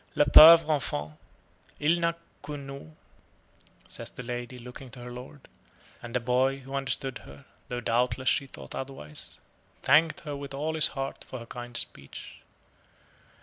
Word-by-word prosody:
"Le 145 - +4
pauvre 165 +3 +10
enfant, 75 - -2 0.6
il 160 +4 +3
n'a 170 0 +1 0.3
que 145 0 -6
nous," 140 +2 -9 1.0
says - - -3
the 125 - -9
lady, 120 +1 -5
looking 125 +2 -10
to 125 - -11
her 120 0 -8
lord; 130 +3 -11 0.5
and 120 0 -7
the - - +3
boy, 130 +3 +1
who 135 +1 -10
understood 135 -2 -2
her, 70 +1 -14 0.2
though 125 0 -4
doubtless 125 +3 0
she 140 +1 +2
thought 70 - -9
otherwise, 130 - -7 0.4
thanked 155 +3 +4
her 145 -3 -5
with 140 -1 -7
all 155 +3 -2
his 160 -1 +5
heart 135 0 -4
for 130 - -8
her 115 - -9
kind 120 0 -6
speech. 70 -11 -6
130 Hz, 155 wpm, -28 LUFS, 120-145 Hz, 1.0 s, pauvre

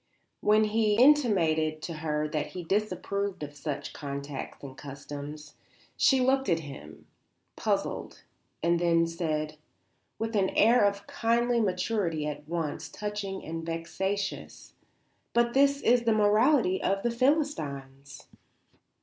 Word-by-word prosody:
When 215 +1 +4
he 215 0 +2
intimated 190 - +4
to 170 - -4
her 155 -1 -1
that 150 -1 -2
he 180 - -5
disapproved 200 -1 -2
of 145 0 -7
such 145 -1 -5
contacts 140 -1 -6
and 135 -1 -8
customs, 145 +1 -8 0.4
she 265 -2 +4
looked 265 -1 +2
at 165 -2 +2
him, 140 -3 -11 0.5
puzzled, - - -2 0.4
and 170 0 +3
then 165 -1 +3
said, 155 -2 -3 0.6
with 225 0 -3
an 190 -2 +2
air 230 0 +6
of 200 0 -1
kindly 235 +1 +1
maturity 185 -5 -1
at 150 0 -6
once 165 -3 -3
touching 205 -2 -5
and 165 +1 -5
vexatious: 190 +4 -4 0.6
"But 235 0 +2
that 280 +1 +3
is 240 +1 +4
the 230 -1 +2
morality 215 0 +3
of 195 +1 0
the 240 - +1
Philistines." 150 - -1
185 Hz, 125 wpm, -28 LUFS, 155-225 Hz, 0.6 s, air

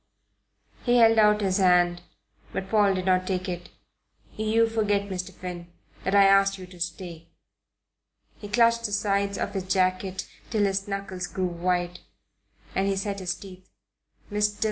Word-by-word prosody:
He 245 -1 +3
held 225 -1 +6
out 210 0 +5
his 190 -1 +1
hand; 175 -2 +3 0.5
but 190 - -4
Paul 205 -3 +4
did 185 -1 -3
not 185 -1 +2
take 185 -1 -2
it. 175 -1 -5 0.7
"You 220 +1 +2
forget, 205 -3 0
Mr. 185 0 -4
Finn, 175 -1 -8 0.3
that 195 - 0
I 200 - +7
asked 195 0 +4
you 185 - -9
to 180 -1 -15
stay." 170 -1 -6 1.1
He 205 - -8
clutched 230 +1 +3
the 205 - -2
sides 200 -1 0
of - - -3
his 190 -2 -3
jacket 185 0 0 0.2
till 215 -2 +1
his 195 0 0
knuckles 195 -2 -4
grew 185 - -2
white, 175 0 -1 0.7
and 195 +1 0
he 195 - +1
set 200 +1 -3
his 180 -1 -2
teeth. 185 -1 -13 0.6
"Mr. 210 0 0
195 Hz, 160 wpm, -26 LUFS, 185-205 Hz, 1.1 s, I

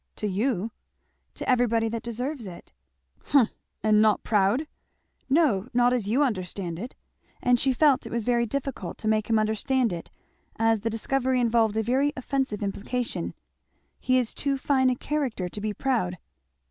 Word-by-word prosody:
"To - - -4
you!" 210 +1 0 0.6
"To - - -6
everybody 235 -3 +2
that 230 0 -3
deserves 245 +1 -4
it." 170 - -11 0.5
"Humph! 265 -6 +4 0.3
And 215 -1 +4
not 215 -1 +3
proud?" 210 +7 +2 0.6
"No, 260 - +3
not 245 0 +4
as 235 -5 0
you 260 +7 +3
understand 185 - -3
it," 240 +6 -7 0.4
and 245 -1 +3
she 270 - +2
felt 275 0 +3
it - - -9
was 235 -2 -2
very 235 -1 +2
difficult 260 -8 -4
to 220 - -4
make 215 0 +1
him 225 - +4
understand 220 +2 +1
it, 170 - -7 0.5
as 225 0 +2
the 225 - -1
discovery 255 +3 0
involved 225 -2 +2
a 220 - +2
very 270 +6 +1
offensive 260 -5 -2
implication; 225 +5 -3 0.6
"he 255 0 +2
is 245 -3 0
too 280 -1 -1
fine 265 -1 +2
a 250 - +1
character 260 -10 -2
to 205 +4 -7
be 215 0 -1
proud." 205 -7 -1
235 Hz, 165 wpm, -26 LUFS, 215-260 Hz, 0.6 s, Humph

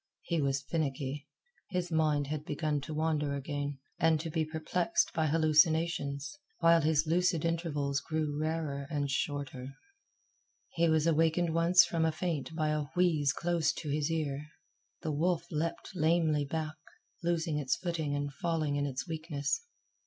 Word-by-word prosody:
He 170 -3 0
was 135 -1 0
finicky. 140 -2 -2 0.4
His 180 -2 -2
mind 155 -3 +2
had 150 +1 -4
begun 150 -1 -1
to 155 - -6
wander 150 -2 0
again, 145 0 -3 0.2
and 160 -1 +4
to 160 +1 -4
be 160 +1 +1
perplexed 160 +3 0
by 160 -1 +1
hallucinations, 155 - +2 0.2
while 165 0 +5
his 155 0 +3
lucid 170 0 +2
intervals 150 -4 0
grew 155 0 -2
rarer 155 -2 -2
and 145 -3 -1
shorter. 140 -2 -3 0.9
He 170 0 +2
was 160 -1 +3
awakened 165 +1 +2
once 175 +2 +6
from 165 -2 0
a 160 - +3
faint 160 -1 -3
by 155 -2 +1
a 150 -1 0
wheeze 160 -6 +3
close 170 -2 +1
in 145 - -2
his 150 +1 0
ear. 150 -3 -2 0.6
The 160 - -1
wolf 165 +3 +1
leaped 160 +1 -2
lamely 160 -3 +2
back, 155 +1 -3 0.4
losing 165 -3 0
its 130 -3 +1
footing 160 -5 -2
and 145 0 -2
falling 155 -1 -1
in 145 0 0
its 130 -2 -4
weakness. 160 - -2
155 Hz, 150 wpm, -31 LUFS, 145-165 Hz, 0.9 s, once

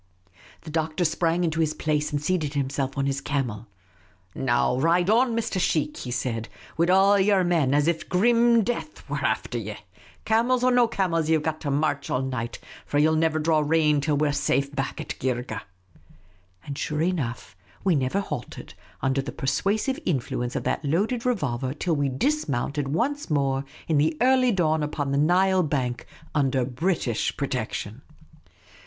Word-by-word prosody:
The 160 - -9
Doctor 160 +2 -1
sprang 170 +2 +1
into 165 -1 -1
his 155 -1 +1
place 150 -1 -1
and 145 - 0
seated 150 -2 -1
himself 135 0 -2
on 135 - +1
his 140 0 -1
camel. 125 -7 -3 0.4
" 95 -1 -35
Now 125 0 +1
ride 175 +6 +3
on, 235 +1 +3
Mr. 230 -4 -1
Sheikh," 150 -3 0
he 125 - -6
said, 120 -2 -3
" - - -20
wid 170 +2 +2
all 195 +2 +5
yer 195 -1 +3
men, 165 -7 +2
as 145 +1 +2
if 170 -1 -1
grim 235 +4 +4
death 195 -9 -4
was 145 -1 -2
afther 120 -2 -1
ye. 105 -1 -6 0.5
Camels 240 +3 +2
or 255 - +4
no 245 -1 +4
camels, 170 -7 0
ye 160 - +5
've 150 - -5
got 155 0 -2
to 145 - -3
march 145 0 0
all 130 - 0
night, 125 -3 -3 0.3
for 145 - -2
ye 150 - +5
'11 160 0 +3
never 160 -1 +2
draw 155 0 +2
rein 150 -1 +2
till 150 0 +1
we 150 +1 +2
're - - +1
safe 140 0 0
back 135 -2 -3
at - - -6
Geergeh! 125 -4 -2 0.5
" 90 +1 -33
And 140 - -5
sure 150 +2 -2
enough 135 - -2 0.3
v^^e 185 -4 +4
never 135 +8 0
halted, 150 -10 -7 0.3
under 135 +1 +1
the 135 - -6
persuasive 210 - -1
influence 125 -5 -2
of - - -2
that - - -1
loaded 210 - 0
revolver, 135 - -1
till 165 +1 0
we 145 -1 0
dismounted 140 - -1
once 250 - -1
more 140 -2 0 0.2
in 155 -3 +2
the 155 +1 +1
early 255 -1 +4
dawn 160 -5 +1
upon 145 -2 -2
the 140 - +1
Nile 185 +4 +3
bank, 130 -7 -2 0.3
under 135 -3 +1
British 130 - -1
protection. - - -3
150 Hz, 180 wpm, -25 LUFS, 135-180 Hz, 0.5 s, all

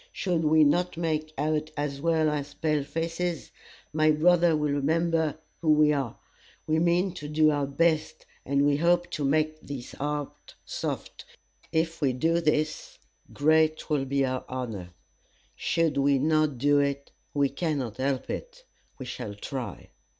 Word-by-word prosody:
Should 175 -4 -1
we 155 0 +5
not 175 +4 +2
make 155 -2 -1
out 155 +1 0
as 145 -1 -3
well 160 -1 +2
as 145 -1 -4
pale 150 -2 0
faces, 165 +3 -3 0.4
my 155 0 +3
brother 165 +1 +4
will 150 -1 0
remember 160 +2 +1 0.2
who 155 -2 +3
we 150 0 +4
are. 135 -5 -2 0.5
We 155 +1 +1
mean 175 +2 +2
to 160 -5 -7
do 155 +1 +3
our 145 -2 0
best, 155 +2 0 0.2
and 140 +1 +1
we 145 -1 +3
hope 175 +2 +2
to 150 - -3
make 155 +2 +1
his 135 -4 -6
heart 145 0 -5
soft. - - -5 0.5
If 165 +1 -1
we 135 -3 +2
do 165 +6 +1
this, 155 -1 -1 0.3
great 155 +1 +2
will 140 -3 +1
be 135 0 +1
our 130 -1 -2
honor. 115 -8 -5 0.7
Should 165 -3 0
we 140 0 +3
not 155 0 +2
do 145 +3 +3
it, 140 0 -1 0.2
we 140 -1 +3
cannot 140 - -2
help 135 0 -1
it. - - -7 0.3
We 130 - -7
shall 110 -4 -6
try." 125 +4 -6
150 Hz, 155 wpm, -27 LUFS, 140-160 Hz, 0.7 s, we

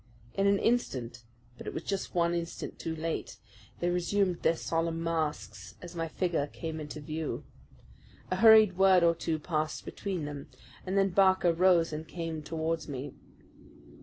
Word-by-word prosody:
In 195 0 +2
an 200 0 +4
instant 130 - -1 0.4
but - - -9
it - - -5
was - - -4
just 195 -2 -3
one 170 0 +2
instant 170 0 -4
too 165 -1 -3
late 160 +1 -4 0.4
they 175 - +1
resumed 180 +1 0
their 165 - +3
solemn 165 0 -1
masks 160 -2 -3
as 175 -1 -10
my 165 -1 -2
figure 165 -3 -1
came 160 +1 -6
into 150 0 -6
view. 155 +1 -4 0.9
A 185 - +1
hurried 220 -3 +7
word 190 -2 +6
or 170 0 +5
two 165 -1 -2
passed 155 0 -2
between 185 -6 -4
them, 145 -1 -7 0.4
and 190 +2 0
then 195 0 +4
Barker 190 -2 +4
rose 170 -2 +4
and 155 +1 -5
came 165 -2 -4
towards 160 +1 -2
me. 140 -1 -5
165 Hz, 165 wpm, -30 LUFS, 155-185 Hz, 0.9 s, hurried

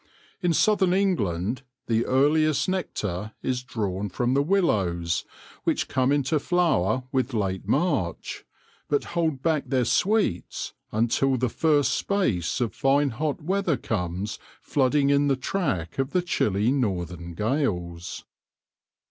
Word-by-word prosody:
In 175 - +2
southern 190 +1 +3
England 125 - 0 0.2
the 115 0 +1
earliest 150 +3 +3
nectar 110 - -3
is 125 -1 -1
drawn 105 -5 -3
from 120 +7 0
the 140 - +3
willows, 95 - +1 0.4
which - - 0
come 130 +1 +1
into 145 +1 +2
flower 145 - +1
with 130 -1 0
late 95 -3 -2
March, 140 - -1 0.5
but 145 - +2
hold 160 -6 0
back 155 -4 +1
their 130 -1 +1
sweets 195 - 0 0.2
until 120 +4 +2
the 125 0 0
first 145 +3 +2
space 130 - 0
of 120 -3 -1
fine 140 +1 +2
hot 150 +5 -2
weather 185 -3 +1
comes 100 +1 -3 0.2
flooding 140 +1 +2
in 140 0 +3
the 140 - +3
track 130 - -2
of 135 +1 -1
the 180 -1 +2
chilly 105 - +1
northern 90 - -2
gales. 90 - -2
130 Hz, 130 wpm, -25 LUFS, 100-155 Hz, 0.5 s, southern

